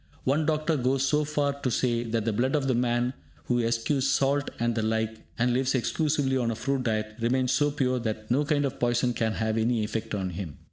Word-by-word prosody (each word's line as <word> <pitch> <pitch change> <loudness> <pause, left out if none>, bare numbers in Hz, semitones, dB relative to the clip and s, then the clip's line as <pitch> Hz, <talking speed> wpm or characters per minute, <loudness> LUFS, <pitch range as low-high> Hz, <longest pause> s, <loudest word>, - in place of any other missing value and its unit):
One 145 +3 +1
doctor 155 0 +1
goes 130 +1 +1
so 150 +2 +2
far 145 -1 0
as 140 - -14
to 130 - 0
say 120 0 +1
that 115 -2 -2
the 115 - +1
blood 130 +7 +1
of 140 -2 0
the 130 - +2
man 120 +1 +1 0.3
who 120 -1 +1
eschews 120 +4 0
salt 140 +1 +1
and 120 0 0
the 115 - -1
like, 110 0 -1 0.2
and 125 +1 +2
lives 130 +1 +1
exclusively 140 +1 +1
on 120 -2 0
a 115 - -1
fruit 135 +3 -1
diet, 110 -3 -1
remains 125 +2 +1
so 145 +2 +3
pure 130 -3 0
that 110 -1 -4
no 140 +4 +3
kind 145 -1 +1
of 135 - -4
poison 120 0 +1
can 110 -2 0
have 110 0 -1
any 115 0 +1
effect 110 0 -3
on 95 -2 -2
him. 85 -5 -6
125 Hz, 230 wpm, -27 LUFS, 115-140 Hz, 0.3 s, so